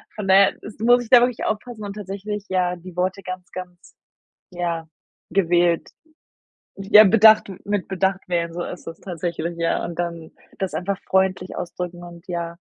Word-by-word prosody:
Von 210 Hz, -2 st, -5 dB
daher 195 Hz, +1 st, +6 dB
ist 210 Hz, 0 st, -10 dB
muss 245 Hz, +2 st, +4 dB
ich 230 Hz, -, -13 dB
da 250 Hz, -2 st, +9 dB
wirklich 245 Hz, -1 st, 0 dB
aufpassen 215 Hz, 0 st, -4 dB
und 200 Hz, -1 st, -5 dB
tatsächlich, 205 Hz, +1 st, -5 dB
ja, 180 Hz, -1 st, 0 dB
die 180 Hz, 0 st, -12 dB
Worte 185 Hz, +2 st, -1 dB
ganz, 185 Hz, 0 st, -7 dB
ganz, 180 Hz, -1 st, -10 dB, 0.6 s
ja, 170 Hz, -2 st, -3 dB, 0.4 s
gewählt, 175 Hz, -2 st, +2 dB, 0.9 s
ja 210 Hz, +2 st, +7 dB
bedacht 215 Hz, +1 st, +6 dB, 0.2 s
mit 205 Hz, -2 st, -2 dB
bedacht 190 Hz, 0 st, 0 dB
wählen, 170 Hz, -1 st, -1 dB
so 175 Hz, +1 st, -4 dB
ist 180 Hz, -, -8 dB
es 165 Hz, 0 st, -8 dB
tatsächlich, 170 Hz, -1 st, -4 dB
ja, 165 Hz, 0 st, 0 dB
und 170 Hz, 0 st, -6 dB
dann 170 Hz, -2 st, -4 dB, 0.3 s
das 190 Hz, -1 st, -3 dB
einfach 195 Hz, +2 st, -2 dB
freundlich 190 Hz, -1 st, +1 dB
ausdrücken 175 Hz, 0 st, -5 dB
und, 170 Hz, 0 st, -12 dB
ja, 170 Hz, -1 st, -4 dB
185 Hz, 165 wpm, -22 LUFS, 175-200 Hz, 0.9 s, da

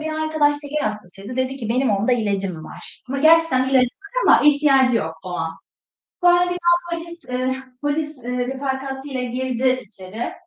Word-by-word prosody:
bir 315 Hz, 0 st, -3 dB
arkadaş 310 Hz, -2 st, +2 dB
şeker 295 Hz, -1 st, -2 dB
hastasıydı. 210 Hz, +2 st, -7 dB
Dedi 260 Hz, +1 st, -1 dB
ki, 230 Hz, -5 st, -6 dB
"Benim 250 Hz, +2 st, +1 dB
onda 205 Hz, +5 st, +1 dB
ilacım 195 Hz, -8 st, -1 dB
var." -, -, -11 dB
Ama 275 Hz, +2 st, -2 dB
gerçekten 315 Hz, -3 st, +5 dB
de -, -, -2 dB
ilacı 255 Hz, -2 st, +5 dB
var 405 Hz, -, -5 dB
ama -, -, +7 dB
ihtiyacı 275 Hz, -4 st, +4 dB
yok 160 Hz, -6 st, -2 dB
o -, -, -6 dB
an. 165 Hz, -2 st, -3 dB, 0.7 s
Sonra 350 Hz, 0 st, +6 dB
birden 345 Hz, -1 st, +2 dB, 0.2 s
polis, 340 Hz, -2 st, -11 dB
eee, 255 Hz, +1 st, -1 dB, 0.3 s
polis, 290 Hz, -2 st, -2 dB
eee, 250 Hz, +1 st, -3 dB
refakatiyle 265 Hz, +1 st, -3 dB
girdi 255 Hz, +1 st, -1 dB
içeri. 200 Hz, +3 st, -7 dB
260 Hz, 165 wpm, -21 LUFS, 235-295 Hz, 0.7 s, ama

